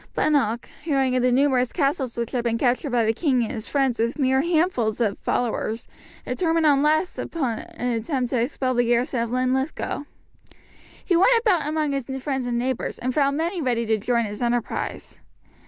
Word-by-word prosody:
Bunnock, 250 Hz, -7 st, +1 dB, 0.2 s
hearing 270 Hz, -4 st, +1 dB
of 255 Hz, -, +2 dB
the 250 Hz, 0 st, +3 dB
numerous 255 Hz, -1 st, +2 dB
castles 275 Hz, -6 st, -1 dB
which 235 Hz, -1 st, -2 dB
had 245 Hz, -3 st, -1 dB
been 230 Hz, -1 st, 0 dB
captured 255 Hz, +4 st, +1 dB
by 240 Hz, -3 st, +2 dB
the 220 Hz, -, +2 dB
king 255 Hz, -2 st, +1 dB
and 225 Hz, -, -3 dB
his 220 Hz, -, -5 dB
friends 270 Hz, -4 st, 0 dB
with 235 Hz, +4 st, 0 dB
mere 265 Hz, -2 st, +2 dB
handfuls 315 Hz, -, +1 dB
of 215 Hz, -4 st, 0 dB
followers, 230 Hz, -1 st, -2 dB, 0.4 s
determined 330 Hz, -2 st, +1 dB
at 285 Hz, -2 st, +5 dB
last 310 Hz, +5 st, +1 dB
upon 260 Hz, -9 st, -2 dB
an 250 Hz, -, -5 dB
attempt 245 Hz, +2 st, -1 dB
to 245 Hz, -, +1 dB
expel 255 Hz, +1 st, -1 dB
the 245 Hz, 0 st, +2 dB
garrison 240 Hz, +1 st, +1 dB
of 230 Hz, 0 st, -1 dB
Linlithgow. 260 Hz, +4 st, -1 dB, 1.0 s
He 360 Hz, -, +2 dB
went 460 Hz, +7 st, +5 dB
about 380 Hz, -10 st, +1 dB
among 305 Hz, -1 st, 0 dB
his 275 Hz, -3 st, -3 dB, 0.2 s
friends 265 Hz, -3 st, -2 dB
and 240 Hz, -1 st, -1 dB
neighbours, 255 Hz, +1 st, -2 dB
and 255 Hz, +1 st, -2 dB
found 280 Hz, 0 st, +2 dB
many 340 Hz, +2 st, -1 dB
ready 240 Hz, -4 st, 0 dB
to 220 Hz, -1 st, +1 dB
join 235 Hz, +2 st, +1 dB
his 205 Hz, +1 st, -6 dB
enterprise. 240 Hz, -1 st, -2 dB
255 Hz, 190 wpm, -24 LUFS, 235-295 Hz, 1.0 s, at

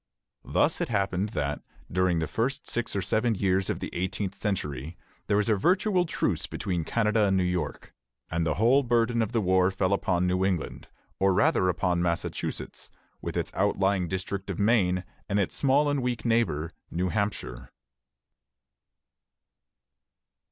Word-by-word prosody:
Thus -, -, +1 dB
it -, -, -1 dB
happened 100 Hz, -2 st, 0 dB
that, 75 Hz, -8 st, -2 dB, 0.3 s
during 90 Hz, -1 st, +2 dB
the 80 Hz, -, 0 dB
first 120 Hz, -, -2 dB
six 120 Hz, -3 st, -2 dB
or 100 Hz, -, 0 dB
seven 110 Hz, +4 st, +1 dB
years 95 Hz, 0 st, +1 dB
of -, -, -1 dB
the -, -, -5 dB
eighteenth 95 Hz, +2 st, -2 dB
century, 80 Hz, -7 st, -3 dB, 0.3 s
there 100 Hz, -, +2 dB
was 105 Hz, -, +1 dB
a 110 Hz, -, +4 dB
virtual 180 Hz, -, +2 dB
truce -, -, -1 dB
between 90 Hz, -3 st, -2 dB
Canada 105 Hz, +2 st, +2 dB
and 95 Hz, -1 st, +2 dB
New 95 Hz, -, +2 dB
York, 90 Hz, -1 st, -3 dB, 0.4 s
and 85 Hz, +1 st, 0 dB
the 80 Hz, -2 st, 0 dB
whole 120 Hz, +6 st, +4 dB
burden 120 Hz, -2 st, +2 dB
of 110 Hz, -, -1 dB
the 115 Hz, -, +1 dB
war 95 Hz, -1 st, +3 dB
fell 95 Hz, 0 st, 0 dB
upon 90 Hz, -2 st, +1 dB
New 90 Hz, +1 st, +1 dB
England, 95 Hz, -4 st, -2 dB, 0.3 s
or 95 Hz, -1 st, +3 dB
rather 105 Hz, -, +3 dB
upon 90 Hz, 0 st, 0 dB
Massachusetts, 85 Hz, -1 st, -3 dB, 0.3 s
with -, -, -4 dB
its -, -, -2 dB
outlying 95 Hz, -2 st, +1 dB
district 95 Hz, +2 st, -4 dB
of 95 Hz, -, -3 dB
Maine 95 Hz, -4 st, +2 dB, 0.3 s
and 100 Hz, 0 st, +1 dB
its 100 Hz, -, 0 dB
small 140 Hz, +2 st, +3 dB
and 145 Hz, -2 st, +1 dB
weak 125 Hz, -2 st, -2 dB
neighbor, 110 Hz, -9 st, +1 dB, 0.2 s
New 90 Hz, +2 st, -1 dB
Hampshire. 65 Hz, -, -3 dB
95 Hz, 160 wpm, -27 LUFS, 90-115 Hz, 0.4 s, a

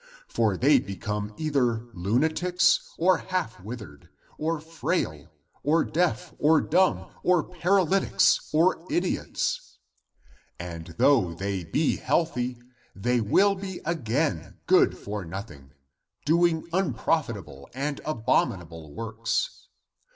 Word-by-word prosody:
For 110 Hz, -5 st, +1 dB
they 140 Hz, +4 st, +5 dB
become 105 Hz, 0 st, -4 dB
either 125 Hz, -7 st, 0 dB
lunatics, 160 Hz, -, +1 dB
or 180 Hz, +1 st, +3 dB
half 180 Hz, -, -3 dB
withered, 105 Hz, -, -9 dB, 0.3 s
or 160 Hz, +1 st, -1 dB
frail, 160 Hz, +1 st, -3 dB, 0.3 s
or 160 Hz, +4 st, +3 dB
deaf, 175 Hz, +1 st, -1 dB
or 155 Hz, +1 st, +5 dB
dumb, 185 Hz, +3 st, +1 dB
or 180 Hz, -3 st, +3 dB
paralytics, 185 Hz, +1 st, +2 dB
or 165 Hz, +2 st, +3 dB
idiots. 175 Hz, +1 st, -2 dB, 0.8 s
And 85 Hz, -2 st, -7 dB
though 100 Hz, -13 st, +3 dB
the}^ 95 Hz, -3 st, -4 dB
be 155 Hz, 0 st, +2 dB
healthy, 125 Hz, -7 st, 0 dB, 0.4 s
they 120 Hz, +4 st, +1 dB
will 195 Hz, -, +4 dB
be 190 Hz, -1 st, -6 dB
again 130 Hz, -, -1 dB
good -, -, +4 dB
for 105 Hz, -1 st, -5 dB
nothing, 80 Hz, -6 st, -8 dB, 0.5 s
doing 165 Hz, +1 st, +2 dB
unprofitable 125 Hz, -, -1 dB
and 140 Hz, +2 st, -3 dB
abominable 85 Hz, -, -1 dB
works. 115 Hz, -, -3 dB
135 Hz, 105 wpm, -26 LUFS, 100-170 Hz, 0.8 s, they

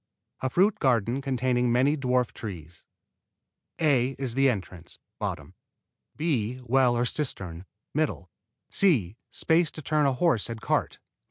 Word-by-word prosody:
24 130 Hz, -, -1 dB
A -, -, -2 dB
FRUIT 190 Hz, +9 st, +2 dB
GARDEN 120 Hz, 0 st, +1 dB
CONTAINING 125 Hz, -2 st, +1 dB
MANY 130 Hz, +5 st, +3 dB
DWARF 125 Hz, -3 st, 0 dB
TREES 85 Hz, -6 st, -8 dB, 1.0 s
A 135 Hz, -4 st, +2 dB
is 130 Hz, -4 st, -3 dB
the 135 Hz, +2 st, +4 dB
entrance; 95 Hz, -6 st, -5 dB, 1.2 s
B, 130 Hz, -7 st, -1 dB
well 125 Hz, 0 st, +3 dB
or 120 Hz, -, +1 dB
cistern; 95 Hz, -, -3 dB, 1.1 s
C, 120 Hz, -, +3 dB
space 165 Hz, 0 st, +2 dB
to 155 Hz, -, -10 dB
turn 150 Hz, 0 st, +2 dB
a 135 Hz, -, +2 dB
horse 125 Hz, -, +1 dB
and 115 Hz, -1 st, -5 dB
cart. -, -, -1 dB
125 Hz, 125 wpm, -27 LUFS, 115-140 Hz, 1.2 s, the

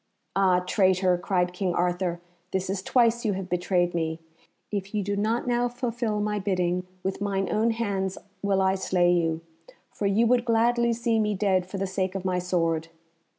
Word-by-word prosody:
"Ah, 185 Hz, -2 st, +4 dB
traitor!" 185 Hz, -1 st, +2 dB
cried 180 Hz, 0 st, 0 dB
King 180 Hz, -1 st, -1 dB
Arthur, 175 Hz, 0 st, 0 dB, 0.3 s
"this 190 Hz, 0 st, -2 dB
is 195 Hz, -1 st, -2 dB
twice 235 Hz, +2 st, +2 dB
you 215 Hz, -3 st, +1 dB
have 190 Hz, -1 st, -4 dB
betrayed 175 Hz, 0 st, +1 dB
me. 160 Hz, -1 st, -2 dB, 0.5 s
If 200 Hz, 0 st, -4 dB
you 205 Hz, -, 0 dB
do 200 Hz, +1 st, -1 dB
not 220 Hz, +4 st, 0 dB
now 245 Hz, 0 st, +1 dB
fulfil 235 Hz, -3 st, -2 dB
my 210 Hz, 0 st, -1 dB
bidding, 180 Hz, -2 st, 0 dB, 0.2 s
with 190 Hz, +1 st, -3 dB
mine 195 Hz, -2 st, 0 dB
own 220 Hz, +2 st, +2 dB
hands 200 Hz, -4 st, -1 dB, 0.2 s
will 195 Hz, -1 st, +2 dB
I 190 Hz, 0 st, +3 dB
slay 180 Hz, -2 st, +2 dB
you, 165 Hz, -2 st, 0 dB, 0.5 s
for 205 Hz, -, -1 dB
you 210 Hz, +4 st, +3 dB
would 240 Hz, +1 st, +3 dB
gladly 235 Hz, 0 st, +2 dB
see 230 Hz, -1 st, +1 dB
me 210 Hz, -1 st, +1 dB
dead 190 Hz, -2 st, +1 dB
for 195 Hz, -, -6 dB
the 195 Hz, -, -1 dB
sake 190 Hz, 0 st, -2 dB
of 190 Hz, -1 st, -4 dB
my 180 Hz, -1 st, +1 dB
sword." 165 Hz, -3 st, 0 dB
195 Hz, 185 wpm, -26 LUFS, 180-215 Hz, 0.5 s, Ah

